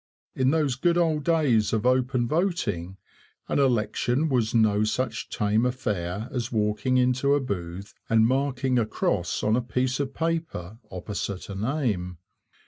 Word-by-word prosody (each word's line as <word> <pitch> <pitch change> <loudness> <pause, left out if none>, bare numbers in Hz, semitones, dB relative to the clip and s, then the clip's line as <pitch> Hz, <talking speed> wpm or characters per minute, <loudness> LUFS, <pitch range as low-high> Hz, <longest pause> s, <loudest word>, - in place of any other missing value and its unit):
In 130 0 +2
those 145 -4 +1
good 170 +5 +2
old 160 -4 +1
days 140 -11 +2
of 110 +1 0
open 125 -1 +2
voting 150 - -1 0.5
an - - 0
election 125 +3 +1
was 120 -5 +1
no 110 -2 +3
such 115 +1 -2
tame 105 +2 +1
affair 105 -5 -2
as 120 -2 -3
walking 110 +3 +1
into 130 +3 +3
a - - +2
booth 95 -6 -5 0.2
and 110 -1 +5
marking 130 0 +1
a 110 - 0
cross 90 -4 -1
on 105 +1 +3
a 125 - +1
piece 125 +3 -1
of 135 -1 -3
paper 160 - -3
opposite 95 +1 -5
a 100 - -5
name. 105 - -2
120 Hz, 150 wpm, -26 LUFS, 105-135 Hz, 0.5 s, and